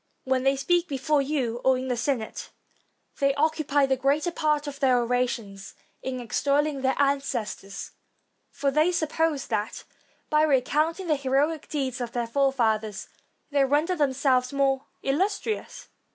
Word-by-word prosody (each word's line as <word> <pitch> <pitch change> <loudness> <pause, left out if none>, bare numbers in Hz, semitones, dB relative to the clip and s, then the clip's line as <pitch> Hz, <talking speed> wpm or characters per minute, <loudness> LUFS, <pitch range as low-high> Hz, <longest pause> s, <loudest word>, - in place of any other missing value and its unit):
When 260 -1 +1
they 270 +1 +3
speak 350 +6 +1
before 285 +1 +1
you 260 -5 -2
or 260 -1 +4
in 260 +1 -4
the 250 - 0
Senate, 240 -2 -3 0.7
they 275 0 +2
occupy 290 -1 +2
the 265 0 +1
greater 280 +6 +1
part 305 -2 0
of 285 -1 -6
their 260 -3 +4
orations 235 -5 -2 0.3
in 260 -1 -4
extolling 280 +4 0
their 265 0 +1
ancestors; 265 -8 -2 0.6
for 280 -1 -1
they 310 +5 +3
suppose 315 -3 0
that 210 +1 -3 0.4
by 305 0 +3
recounting 310 +5 +1
the 315 -3 +2
heroic 280 +3 0
deeds 265 -4 -2
of 235 -1 -4
their 240 -1 -1
forefathers, 230 -5 0 0.4
they 285 -1 +3
render 295 +7 +2
themselves 265 -4 +1
more 275 -1 +1 0.2
illustrious. 395 +9 -2
275 Hz, 140 wpm, -26 LUFS, 255-300 Hz, 0.7 s, or